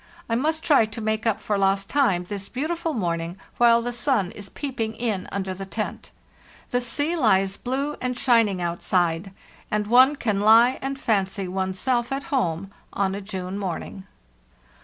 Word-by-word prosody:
I 230 - -2
must 315 +7 0
try 280 -10 +4
to 220 +2 -8
make 220 +1 -1
up 220 -2 +1
for 205 -2 -1
lost 195 0 +2
time 225 -12 +2
this 200 +1 -6
beautiful 325 +4 -2
morning, 170 -3 -2 0.2
while 235 -1 +5
the 245 0 -3
sun 240 -7 +1
is 200 -1 -7
peeping 230 -6 -4
in 220 -6 -2
under 190 -1 -3
the 190 +1 -7
tent. 215 +2 -5 0.6
The 245 -1 +1
sea 290 +6 0
hes 195 - +2
blue 275 +6 -2
and 250 -1 -2
shining 225 -8 +3
outside, 175 +1 0 0.4
and 210 0 0
one 255 +6 +6
can 210 -7 -1
lie 230 +4 +6
and 270 +1 -3
fancy 195 -4 0
one's 190 +1 -2
self 240 +2 0
at 275 +1 -2
home 190 -6 -1 0.2
on 195 -1 0
a 200 - -4
June 190 -1 -5
morning." 190 +1 -5
215 Hz, 170 wpm, -24 LUFS, 190-250 Hz, 0.6 s, one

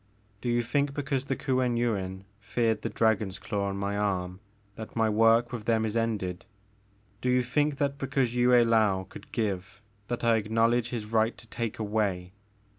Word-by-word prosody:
Do 120 - -2
you 120 0 +2
think 140 +3 0
because 140 -2 -1
the 135 - -1
Kuen 130 -3 0
Yuin 95 -5 -1 0.2
feared 110 +2 0
the - - -2
dragon's 110 -4 +1
claw 100 -3 -2
on 100 - -4
my 100 +1 -2
arm 95 -3 -1 0.4
that 110 - -9
my 115 -1 +2
work 115 +2 +4
with 115 -4 -5
them 110 -1 +2
is 110 0 -3
ended? 105 -5 -2 0.7
Do 125 - 0
you 125 0 +3
think 145 +4 +1
that 140 0 -1
because 135 -3 0
Yue 125 0 +3
I^ou 110 -6 +4
could - - -12
give, 95 -4 -3 0.3
that 120 0 -3
I 115 -1 +4
acknowledge 115 +2 +1
his 115 -4 -4
right 110 +1 +1
to - - -14
take 115 -1 -4
away? 100 -4 -1
115 Hz, 180 wpm, -28 LUFS, 100-120 Hz, 0.7 s, work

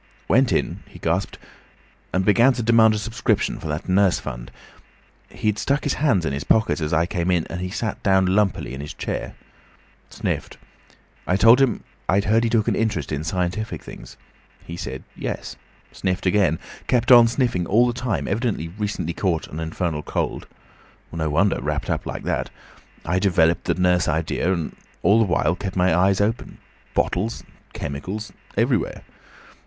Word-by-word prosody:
"Went 125 +3 +3
in," - - 0
he - - -13
gasped, 85 +4 -1 0.7
"and 95 0 0
began 120 +6 +5
to 120 -1 -3
demand 110 -1 +5
a - - -1
subscription 115 +4 -1
for - - -6
that 75 0 -4
Nurse 95 0 +3
Fund. - - -7 0.8
He'd 105 -1 -1
stuck 140 +2 0
his 145 - 0
hands 110 - +3
in 70 - -1
his 70 - -3
pockets 110 -5 +2
as 75 - -2
I 80 +1 +3
came 85 0 -2
in, 90 -3 +2
and 85 +2 -4
he 90 - -3
sat 110 +3 -3
down 95 -1 +3
lumpily 95 -7 +1
in 65 - -6
his 75 - -7
chair. - - -4 0.7
Sniffed. - - -4 0.7
I 90 - +2
told 115 +6 +6
him 130 -5 +1 0.3
I'd 100 +2 +3
heard 110 +3 +3
he 115 - +1
took 110 -2 +1
an - - +2
interest 110 -7 -1
in 75 0 -2
scientific 90 +6 -2
things. - - -11 0.5
He 85 - -7
said 65 -6 -6
yes. - - -5 0.4
Sniffed 95 -1 -2
again. 90 -4 +3 0.3
Kept 120 0 +2
on 120 -2 +9
sniffing 115 -8 0
all 115 +5 +4
the 120 - 0
time; 120 -4 -2
evidently 100 -6 -1
recently 95 -3 -3
caught 85 -3 -1
an 80 - -6
infernal 80 -1 -2
cold. - - -3 0.6
No 80 -2 -2
wonder, 95 +7 +2
wrapped - - -2
up - - -2
like - - -5
that! - - -2 0.6
I 90 +3 +1
developed 85 -4 +2
the - - +1
nurse 90 -2 +2
idea, 80 +3 0
and 85 -4 -2 0.3
all 105 +3 +5
the 115 - +4
while 85 -3 +1
kept 95 0 -5
my 90 -2 +3
eyes 95 +2 +3
open. 110 +3 -1 0.4
Bottles—chemicals—everywhere. 105 - -3
95 Hz, 170 wpm, -22 LUFS, 85-110 Hz, 0.8 s, on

